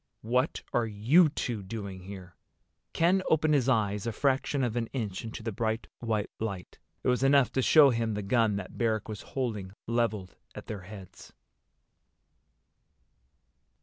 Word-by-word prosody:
"What 125 +6 0
are 120 -1 +2
you 125 - +4
two 120 -7 -3
doing 100 -1 -6
here?" 95 -1 -10 0.6
Ken 180 +3 +3
opened 155 -1 +3
his 135 -3 +2
eyes 105 -3 +1
a - - 0
fraction 135 +3 0
of 120 -2 -1
an 115 -1 -1
inch 105 -8 -3
into 115 0 -7
the 115 - -2
bright 110 +2 -2
white 110 -3 -2
light. 100 -5 -5 0.2
It - - -2
was 125 0 +2
enough 135 -1 +4
to 130 - 0
show 145 +1 +7
him 115 -2 -1
the 105 - -3
gun 110 0 +2
that 100 -2 -6
Barrack 110 -3 0
was 105 -2 -6 0.2
holding 105 -8 -2
leveled 115 -5 -1 0.2
at - - -8
their 105 -3 -6
heads. 95 0 -12
115 Hz, 155 wpm, -29 LUFS, 105-125 Hz, 0.6 s, show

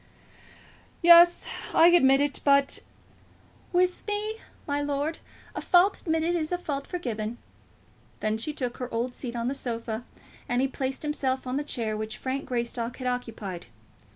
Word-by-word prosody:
"Yes; 345 +1 +7 0.3
I 335 - +8
admit 270 -6 +5
it 285 -1 -1
but 280 -1 +3 0.5
" - - -30
"With 360 0 +2
me, 420 +1 -2 0.3
my 290 0 -1
lord, 290 +2 -2 0.3
a - - -4
fault 365 +3 +4
admitted 325 +1 0
is 315 -1 -2
a 355 - +1
fault 285 -5 -4
forgiven." 235 - -4 0.8
Then 215 +1 -1
she 305 - -2
took 255 -5 -4
her 250 -1 -5
old 240 +2 -2
seat 245 -2 -6
on 235 0 -2
the 265 - 0
sofa, 230 -3 -4 0.5
and 245 0 +1
he 270 - +2
placed 265 +1 -4
himself 265 -3 -1
on 255 +1 -2
the 290 - -1
chair 225 -7 -3
which 215 0 -4
Frank 265 +1 -3
Greystock 235 -1 -3
had 255 - -6
occupied. 225 - -4
270 Hz, 160 wpm, -27 LUFS, 240-315 Hz, 0.8 s, I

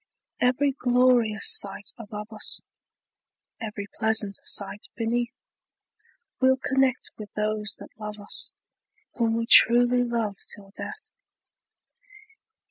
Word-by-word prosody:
Every 255 +3 +1
glorious 245 -4 +4
sight 200 0 -2
above 210 -1 -10
us, 215 - -3 1.0
Every 215 -3 -7
pleasant 220 -3 +2
sight 205 +1 0
beneath, 235 +2 -3 1.0
We'll 260 0 +3
connect 265 -1 -1
with 210 -1 -10
those 210 -1 -2
that - - -15
love 210 0 -8
us, 205 - -2 0.6
Whom 230 -1 -1
we 230 0 -2
truly 245 +1 +6
love 230 -4 -3 0.2
till 195 -1 -17
death! 425 0 -8
225 Hz, 105 wpm, -24 LUFS, 210-245 Hz, 1.0 s, truly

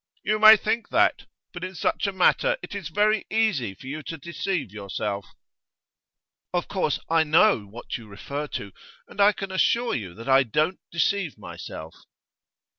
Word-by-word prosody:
'You 215 0 +1
may 215 0 +10
think 220 +3 -2
that. - - +2 0.3
But 175 0 -7
in 185 0 -5
such 185 - 0
a - - 0
matter - - +2
it - - -8
is 195 -6 -5
very 210 +3 +1
easy 195 - 0
for - - -15
you 145 +4 -5
to 165 +2 -7
deceive 170 - -3
yourself.' 100 0 -4 1.3
'Of 175 -1 -1
course 180 -7 0
I 165 0 +3
know 155 - +3
what 120 +4 -7
you 115 - -13
refer 140 +9 -5
to, 100 -7 -6 0.4
and 205 - -4
I 205 +1 +7
can 195 -2 -6
assure 235 +5 +2
you 95 -7 -4
that 115 +1 -10
I 135 0 +6
don't 155 - 0
deceive 170 0 0
myself. 80 +1 -9
165 Hz, 170 wpm, -25 LUFS, 120-200 Hz, 1.3 s, may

